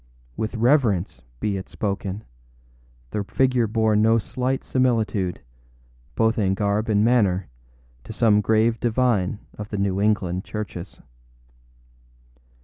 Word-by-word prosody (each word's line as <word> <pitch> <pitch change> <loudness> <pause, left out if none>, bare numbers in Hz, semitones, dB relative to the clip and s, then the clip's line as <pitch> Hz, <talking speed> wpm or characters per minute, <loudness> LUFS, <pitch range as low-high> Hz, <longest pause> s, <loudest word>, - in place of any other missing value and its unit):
With 110 +2 -3
reverence 115 - +2 0.2
be 100 -2 -1
it 95 - -8
spoken, 100 0 -3 0.9
the 105 - -2
figure 125 +3 +1
bore 110 0 +1
no 110 +2 +4
slight 130 +4 -2
similitude, 110 -8 0 0.7
both 110 0 +2
in 95 -2 +1
garb 105 +2 0
and 105 0 +3
manner, 100 -7 +2 0.6
to - - -8
some 105 -2 +3
grave 110 +2 +2
divine 115 -5 +1 0.2
of 105 0 -6
the 105 - -4
New 100 0 0
England 95 -4 0
churches. 105 -5 -7
105 Hz, 120 wpm, -23 LUFS, 100-115 Hz, 0.9 s, no